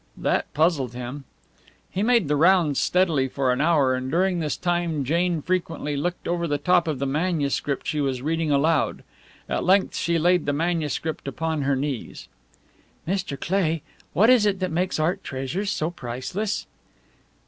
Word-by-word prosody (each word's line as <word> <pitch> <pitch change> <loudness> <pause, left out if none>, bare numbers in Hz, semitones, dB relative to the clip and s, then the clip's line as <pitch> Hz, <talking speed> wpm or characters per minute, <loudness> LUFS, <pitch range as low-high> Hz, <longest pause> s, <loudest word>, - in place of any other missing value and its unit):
That - - 0
puzzled 145 -7 +1
him. 125 +3 -6 0.7
He 190 - -2
made 230 -5 +3
the 150 - +1
rounds 165 -2 +4
steadily 165 -7 +2
for 130 0 0
an 125 - -1
hour, 150 -5 +3
and 130 0 -3
during 180 +3 +1
this 155 -3 -2
time 175 -4 -1
Jane 170 +2 0
frequently 165 -5 -2
looked 175 +5 -3
over 170 0 -1
the 145 -2 0
top 175 +3 +2
of 155 -3 -1
the 140 - -2
manuscript 145 -2 -1
she 150 - -1
was 130 -2 -1
reading 160 +1 0
aloud. 150 +3 +1 0.4
At - - -1
length 190 +2 +3
she 170 0 0
laid 175 0 +2
the 145 - +2
manuscript 160 -1 -2
upon 160 +2 -2
her 140 0 +1
knees. 135 -3 -4 0.8
"Mr. 180 -7 -2
Cleigh, 165 -3 0 0.3
what 220 +6 +5
is 230 -5 +5
it 195 -2 0
that 185 -2 -2
makes 180 +1 -1
art 180 +5 0
treasures 140 +10 -3
so 160 -4 -1
priceless?" 175 - -4
160 Hz, 165 wpm, -24 LUFS, 140-180 Hz, 0.8 s, what